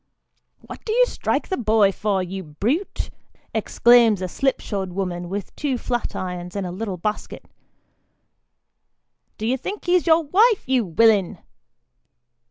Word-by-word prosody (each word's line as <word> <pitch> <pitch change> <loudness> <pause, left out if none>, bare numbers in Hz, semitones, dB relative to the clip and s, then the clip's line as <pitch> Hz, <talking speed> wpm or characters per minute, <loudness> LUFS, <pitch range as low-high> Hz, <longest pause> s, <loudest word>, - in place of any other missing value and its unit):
" - - -47
What - - -10
do 435 - -2
you - - +5
strike - - -2
the 375 - -1
boy 215 -3 +3
for, 195 -1 -1
you 190 +2 -5
brute? 225 - -2 0.2
" - - -39 0.2
exclaims 235 -4 +4
a - - -1
slipshod 195 -5 -2
woman, 175 -2 -3
with 200 +1 -5
two 280 -4 -1
flat 240 0 -3
irons 180 -1 -5
in 200 -2 -2
a 180 - -4
little 190 0 -4
basket. 210 +5 -4 1.9
"Do 215 - -4
you 250 +3 +1
think 395 - -6
he's 355 0 +2
your 325 0 +5
wife, 410 +8 +3
you 255 -3 +2
willin 200 +1 +3
215 Hz, 150 wpm, -22 LUFS, 185-270 Hz, 1.9 s, you